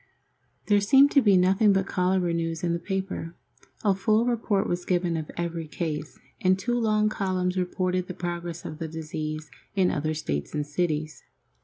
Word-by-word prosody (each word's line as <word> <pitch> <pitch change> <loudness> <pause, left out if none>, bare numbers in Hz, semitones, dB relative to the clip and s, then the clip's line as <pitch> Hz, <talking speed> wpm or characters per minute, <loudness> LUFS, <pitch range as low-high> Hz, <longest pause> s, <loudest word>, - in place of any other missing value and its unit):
There 205 -1 +4
seemed 270 +7 +6
to 280 - +5
be 205 -5 +5
nothing 195 +3 +4
but 195 -1 +1
cholera 180 -2 +1
news 165 0 -2
in 170 -1 +1
the 170 - -1
paper. 190 -2 -4 0.5
A 205 -2 +4
full 215 +4 +2
report 225 -5 +1
was 175 0 -2
given 175 -2 0
of 160 -2 -4
every 170 -1 -3
case, 150 -1 -4 0.2
and 185 0 +4
two 235 +6 -2
long 215 -2 +2
columns 185 -3 -1
reported 185 0 -1
the 180 - -6
progress 175 -1 -5
of 155 - -6
the 165 - -3
disease 155 -1 -5 0.2
in 190 -2 +3
other 155 +1 -1
States 75 - -3
and 150 -1 -1
cities. 155 0 -2
180 Hz, 175 wpm, -26 LUFS, 160-195 Hz, 0.5 s, seemed